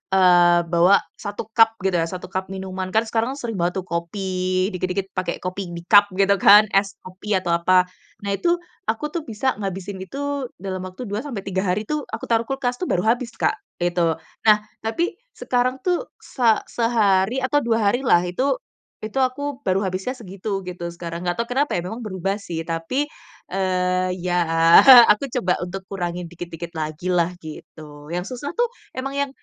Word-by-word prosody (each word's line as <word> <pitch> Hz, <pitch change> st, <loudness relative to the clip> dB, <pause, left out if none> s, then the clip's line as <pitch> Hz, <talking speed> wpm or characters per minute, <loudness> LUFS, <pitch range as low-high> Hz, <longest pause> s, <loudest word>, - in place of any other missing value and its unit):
eee, 175 Hz, -2 st, +5 dB
bawa 175 Hz, +4 st, +5 dB, 0.2 s
1 205 Hz, 0 st, -5 dB
cup 225 Hz, 0 st, +5 dB
gitu 190 Hz, -2 st, +1 dB
ya, 165 Hz, -, 0 dB
1 185 Hz, +1 st, -7 dB
cup 190 Hz, 0 st, -3 dB
minuman, 190 Hz, -1 st, -5 dB
kan 220 Hz, -, +4 dB
sekarang 230 Hz, +4 st, -1 dB
sering 230 Hz, -8 st, -5 dB
bawa 175 Hz, +2 st, 0 dB
tuh 190 Hz, -, -2 dB
kopi, 185 Hz, +2 st, -2 dB
dikit-dikit 185 Hz, +1 st, -3 dB
pake 185 Hz, -2 st, -3 dB
kopi 185 Hz, +1 st, -4 dB
di 170 Hz, -, -7 dB
cup 205 Hz, 0 st, +8 dB
gitu 200 Hz, +1 st, +4 dB
kan? 210 Hz, +2 st, +7 dB
Es 195 Hz, 0 st, +1 dB
kopi 190 Hz, +3 st, -4 dB
atau 180 Hz, -2 st, -1 dB
apa. 180 Hz, +2 st, +4 dB, 0.4 s
Nah, 200 Hz, -, -2 dB
itu, 345 Hz, -, +2 dB, 0.3 s
aku 295 Hz, +7 st, -1 dB
tuh 340 Hz, -, -3 dB
bisa 230 Hz, +2 st, -1 dB
ngabisin 195 Hz, 0 st, -5 dB
itu 285 Hz, +2 st, -3 dB
dalam 185 Hz, 0 st, -5 dB
waktu 185 Hz, +7 st, -8 dB
2-3 205 Hz, -4 st, -3 dB
hari 195 Hz, +4 st, 0 dB
tuh 300 Hz, +5 st, -3 dB
aku 220 Hz, -, -7 dB
taruh 230 Hz, 0 st, +2 dB
kulkas 255 Hz, -2 st, -2 dB
tuh 365 Hz, -, -2 dB
baru 180 Hz, -, 0 dB
habis 240 Hz, +2 st, +1 dB
Kak, -, -, +1 dB, 0.2 s
gitu. 175 Hz, -2 st, +1 dB, 0.3 s
Nah, 210 Hz, -1 st, +8 dB, 0.2 s
tapi 335 Hz, -, -2 dB, 0.2 s
sekarang 255 Hz, -, -1 dB
tuh 365 Hz, +6 st, 0 dB, 0.2 s
se 245 Hz, -3 st, -1 dB, 0.2 s
sehari 230 Hz, 0 st, +2 dB
atau 290 Hz, +3 st, +2 dB
2 225 Hz, -5 st, +2 dB
hari 245 Hz, -, 0 dB
lah, 175 Hz, +1 st, +5 dB
itu 260 Hz, +10 st, 0 dB, 0.5 s
itu 220 Hz, +5 st, -3 dB
aku 265 Hz, +1 st, -1 dB
baru 190 Hz, +2 st, +2 dB
habisnya 190 Hz, +7 st, -3 dB
segitu 195 Hz, -3 st, -5 dB
gitu 175 Hz, -1 st, -6 dB
sekarang. 170 Hz, 0 st, -6 dB
Nggak 175 Hz, -, 0 dB
tau 235 Hz, -, -1 dB
kenapa 280 Hz, -1 st, +1 dB
ya, 175 Hz, -, -1 dB
memang 220 Hz, +6 st, -6 dB
berubah 195 Hz, -2 st, -3 dB
sih 165 Hz, -5 st, -5 dB
tapi, 165 Hz, -, -2 dB, 0.5 s
eee, 185 Hz, -1 st, 0 dB
ya 180 Hz, -1 st, +1 dB, 0.7 s
aku 245 Hz, +7 st, +1 dB
coba 185 Hz, -7 st, +1 dB
untuk 185 Hz, +2 st, -5 dB
kurangi 175 Hz, -2 st, -3 dB
dikit-dikit 170 Hz, 0 st, -8 dB
lagi 155 Hz, +2 st, -3 dB
lah 180 Hz, 0 st, +1 dB
gitu. 150 Hz, -1 st, -11 dB
Yang 180 Hz, +7 st, -4 dB
susah 285 Hz, +6 st, -5 dB
tuh 480 Hz, -, +2 dB, 0.3 s
emang 265 Hz, +1 st, -3 dB
yang 280 Hz, -1 st, 0 dB
195 Hz, 175 wpm, -22 LUFS, 180-235 Hz, 0.7 s, cup